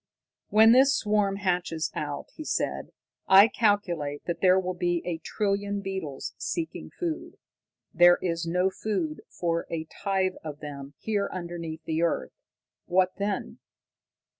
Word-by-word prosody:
"When 220 +1 +7
this 265 +3 +6
swarm 210 -4 +1
hatches 175 -4 -1
out," 145 -1 -5
he 310 - -8
said, - - -2 0.4
"I 195 +3 +9
calculate 175 -11 0
that 175 - -3
there 185 0 +5
will 185 -1 -2
be 175 -1 -1
a 170 -2 -3
trillion 200 +2 -1
beetles 190 -8 -5
seeking 335 -1 -4
food. 335 -3 -5 0.6
There 175 0 +7
is 170 -2 -2
no 180 +3 +1
food 185 -8 -3
for 170 -1 -2
a 165 -1 -3
tithe 190 +1 -1
of 150 -2 -7
them 140 -1 -8
here 205 -2 -1
underneath 170 -3 -6
the 160 0 -1
earth. 170 -1 0 0.5
What 185 +1 +3
then? 200 -1 -3
180 Hz, 140 wpm, -27 LUFS, 165-200 Hz, 0.6 s, I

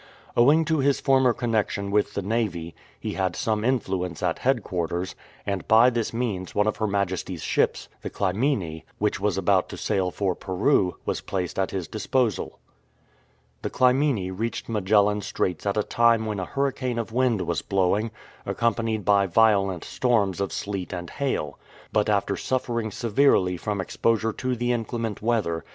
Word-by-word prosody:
Owing 145 +7 +5
to 160 -1 +1
his 140 0 +2
former 130 -2 +4
connexion 110 -4 -1
with 105 0 +1
the 100 - -2
Navy 95 -6 -2 0.3
he - - -4
had 95 -2 -1
some 110 -4 -1
influence 95 -9 -1
at - - 0
headquarters, 90 +1 -1 0.3
and 100 -4 -3
by 115 +3 +6
this 115 -2 -1
means 110 -6 -3
one 105 - +3
of 110 - 0
Her 110 - 0
Majesty 100 -2 -1
""s - - -9
ships, - - 0
the - - -4
Clymenc^ 95 - -1 0.2
which 105 -1 0
was 100 -2 0
about 95 0 +2
to - - -7
sail 95 -3 0
for 95 0 -1
Peru, 95 +1 +1
was - - -2
placed 95 -1 -3
at 95 - +1
his 95 -3 -4
disposal. 110 +1 -1 1.0
The - - -3
Clymene 125 -7 +2
reached 115 +4 -3
Magellan 105 -1 +2
Straits 90 -2 -2
at 100 - 0
a 105 - +2
time 115 0 +3
when 105 -2 -3
a 90 - -2
hurricane 130 -2 -1
of 115 -1 -3
wind 125 -5 +2
was - - -1
blowing, 100 +3 +1 0.3
accompanied 115 -2 -1
by 100 -1 +4
violent 95 -2 +3
storms 105 -7 +1
of 100 - -1
sleet 100 -3 -4
and 85 -1 -6
hail; 130 - -2 0.3
but 105 -1 +2
after 100 -1 +1
suffering 120 -3 -2
severely 105 -3 +2
from 100 +3 -3
exposure 110 +3 0
to 130 +2 -2
the 120 +1 0
inclement 115 -2 -3
weather. 105 -8 0
105 Hz, 165 wpm, -25 LUFS, 95-120 Hz, 1.0 s, by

